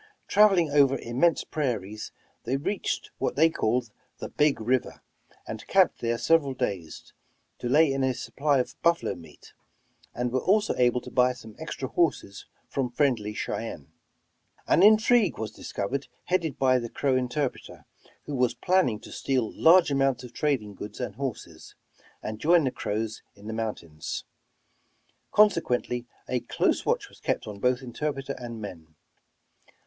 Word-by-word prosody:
Traveling 195 -7 +5
over 140 -2 +4
immense 130 +8 +1
prairies, 110 -8 -3 0.3
they 130 +4 0
reached 185 +8 -3
what - - -1
they 160 +3 +5
called 120 -3 0 0.3
the - - -7
''Big 150 -1 +3
River," 120 +3 -1 0.4
and - - -7
camped - - +3
there 115 0 0
several 145 -2 +2
days, 95 -11 -4 0.5
to 120 - -3
lay 145 +1 +5
in 135 0 0
a 130 -1 +1
supply 145 +2 0
of 125 - -2
buffalo 170 0 +2
meat; 80 -3 -15 0.6
and 125 0 -1
were 130 0 0
also 210 +3 +3
able 125 0 +2
to - - -10
buy 125 0 +3
some 110 -3 -13
extra 155 -4 -5
horses 130 - -1 0.2
from 135 -3 -2
friendly 120 -5 +1
Chey 105 - -3
ennes. - - -10 0.8
An - - +4
intrigue 215 -1 +5
was 110 -1 -4
discovered 120 +6 -4 0.2
headed 170 -6 0
by 130 -1 +3
the 120 -1 -5
Crow 135 +1 0
in 125 -1 0
terpreter, 140 -1 -4 0.4
who 145 - -5
was 125 -2 +1
planning 180 - +2
to - - -12
steal 130 -5 -1
large 170 -1 +5
amounts 135 -2 +1
of 120 -1 -10
trading 120 -7 -1
goods 105 +1 -9
and 125 - -3
horses, 115 - -6 0.5
and 110 0 -5
join 165 +3 +4
the 130 - 0
Crows 110 0 -3
in 100 0 -16
the 110 - -4
mountains; 95 -9 -4 1.1
consequently 125 - +2 0.2
a 125 - 0
close - - 0
watch - - +1
was - - -18
kept - - -1
on 105 -2 -8
both 125 +3 +1
interpreter 135 +3 -3
and 120 -2 -7
men. 80 -7 -9
125 Hz, 155 wpm, -27 LUFS, 115-150 Hz, 1.1 s, Traveling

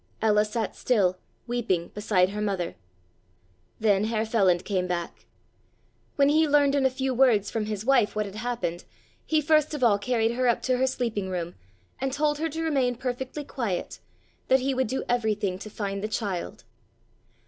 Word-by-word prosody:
Ella 210 -1 +3
sat 215 0 -3
still, 185 -7 +1 0.3
weeping, 230 -8 -1
beside 200 -3 +1
her 210 +1 -4
mother. 195 -5 -1 1.1
Then 210 -2 +3
Herr 220 0 0
Feland 190 -6 +2
came 185 -3 -1
back. 175 -1 -4 0.9
When 280 -1 +4
he 310 +2 +4
learned 285 -1 +4
in 275 -2 +3
a - - 0
few 260 0 -2
words 235 -5 +3
from 220 -2 -2
his 210 0 -4
wife 250 -6 +3
what 210 0 0
had 200 +1 -8
happened, 230 -7 -3 0.4
he 310 -1 +2
first 305 0 +2
of 275 - -3
all 210 -4 +4
carried 225 +1 +1
her 250 +1 0
up 235 - +1
to 255 -1 +1
her 260 +1 +2
sleeping 230 -7 -2
room 175 -2 -3 0.5
and 270 0 -1
told 295 +1 0
her 325 +1 -1
to 320 +2 -4
remain 270 -6 +1
perfectly 260 +4 -4
quiet, 230 -10 -4 0.5
that 265 0 +4
he 270 +1 0
would 260 -1 0
do 265 +4 -2
everything 210 -6 0
to 215 - -8
find 200 -1 -4
the - - 0
child. 195 - -4
225 Hz, 180 wpm, -26 LUFS, 200-265 Hz, 1.1 s, When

